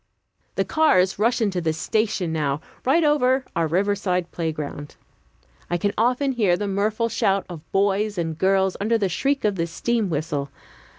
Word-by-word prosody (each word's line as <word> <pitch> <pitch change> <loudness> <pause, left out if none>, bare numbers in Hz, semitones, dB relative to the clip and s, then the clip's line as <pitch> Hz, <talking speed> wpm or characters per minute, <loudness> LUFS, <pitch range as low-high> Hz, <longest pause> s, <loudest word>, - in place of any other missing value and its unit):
The - - 0
cars 190 - +3
rush 235 +3 +2
into 195 -5 0
the 160 -1 0
station 190 0 -1
now, 145 -3 0 0.3
right 310 +6 +4
over 265 -3 +2
our 165 -1 +1
riverside 185 0 0
playground. 150 -3 -5 0.7
I 175 - +1
can 205 +4 -1
often 250 +5 +1
hear 205 -8 +2
the 205 - -3
mirthful 210 +4 0
shout 195 -3 +1
of 165 -3 -10
boys 200 +1 +1
and 165 -2 -2
girls 190 +2 +2
under 225 +3 +2
the 200 -3 0
shriek 275 - 0
of 205 -2 +1
the 165 0 0
steam 220 +5 -1
whistle. 145 -3 -2
195 Hz, 165 wpm, -23 LUFS, 170-225 Hz, 0.7 s, right